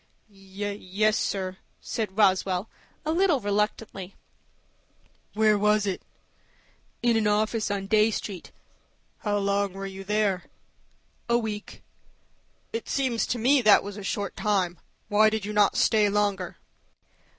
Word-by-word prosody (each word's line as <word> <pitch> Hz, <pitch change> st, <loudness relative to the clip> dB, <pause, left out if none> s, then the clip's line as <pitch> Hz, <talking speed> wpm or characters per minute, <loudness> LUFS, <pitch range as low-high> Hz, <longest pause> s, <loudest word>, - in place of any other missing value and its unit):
"Yes, 200 Hz, +1 st, -2 dB
sir," 190 Hz, -3 st, -2 dB, 0.2 s
said 210 Hz, -4 st, -4 dB
Roswell, 190 Hz, -1 st, +2 dB, 0.4 s
a 310 Hz, -, 0 dB
little 340 Hz, -3 st, +3 dB
reluctantly. 205 Hz, -2 st, -2 dB, 1.2 s
"Where 215 Hz, -1 st, +4 dB
was 210 Hz, 0 st, +3 dB
it?" 195 Hz, -2 st, -2 dB, 1.0 s
"In 240 Hz, -1 st, +3 dB
an 220 Hz, -1 st, +2 dB
office 215 Hz, +1 st, +1 dB
on 200 Hz, -1 st, -2 dB
Dey 215 Hz, +2 st, +4 dB
Street." 200 Hz, -4 st, -5 dB, 0.7 s
"How 205 Hz, -1 st, -1 dB
long 200 Hz, -1 st, 0 dB
were 195 Hz, 0 st, -6 dB
you 195 Hz, 0 st, -7 dB
there?" 200 Hz, -3 st, 0 dB, 0.8 s
"A 235 Hz, -, +4 dB
week." 215 Hz, -3 st, -5 dB, 0.9 s
"It 230 Hz, -, -4 dB
seems 260 Hz, -4 st, 0 dB
to 245 Hz, -, -1 dB
me 260 Hz, +4 st, +4 dB
that 215 Hz, -3 st, +6 dB
was 200 Hz, 0 st, -7 dB
a 205 Hz, -, -7 dB
short 200 Hz, 0 st, -3 dB
time. 185 Hz, -4 st, 0 dB, 0.3 s
Why 215 Hz, +1 st, +5 dB
did 215 Hz, -2 st, -3 dB
you 210 Hz, -, -4 dB
not 210 Hz, -1 st, +3 dB
stay 215 Hz, -2 st, +4 dB
longer?" 200 Hz, -3 st, -1 dB
205 Hz, 130 wpm, -26 LUFS, 195-215 Hz, 1.2 s, that